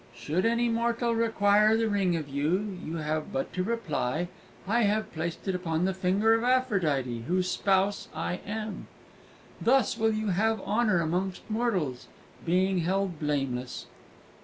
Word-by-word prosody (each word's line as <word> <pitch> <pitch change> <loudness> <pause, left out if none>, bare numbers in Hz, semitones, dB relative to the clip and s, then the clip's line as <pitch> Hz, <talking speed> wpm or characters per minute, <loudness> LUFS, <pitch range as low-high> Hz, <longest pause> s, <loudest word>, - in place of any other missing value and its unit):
"Should 150 - 0
any 235 +1 +2
mortal 235 +1 0
require 215 -1 +3
the 225 0 +1
ring 195 -4 +1
of 155 -3 -3
you, 170 +9 -1
you 160 - -4
have 155 -1 -2
but 135 - -3
to 185 - -1
reply, 175 - -2 0.4
'I 230 +4 +2
have 215 0 0
placed 170 +4 -4
it 190 - +1
upon 175 -2 -1
the 190 - +1
finger 190 +4 +2
of 225 0 +1
Aphrodite, 160 - +1
whose 180 0 +1
spouse 195 +1 +1
I 180 - -3
am!' 215 0 -5 0.7
Thus 240 -1 +3
will 225 0 +3
you 215 -1 -1
have 220 +4 +1
honour 210 -4 +2
amongst 180 +3 -2
mortals, 190 - -1 0.4
being 185 +2 +2
held 185 0 -1
blameless!" 135 -4 -2
190 Hz, 150 wpm, -28 LUFS, 160-220 Hz, 0.7 s, require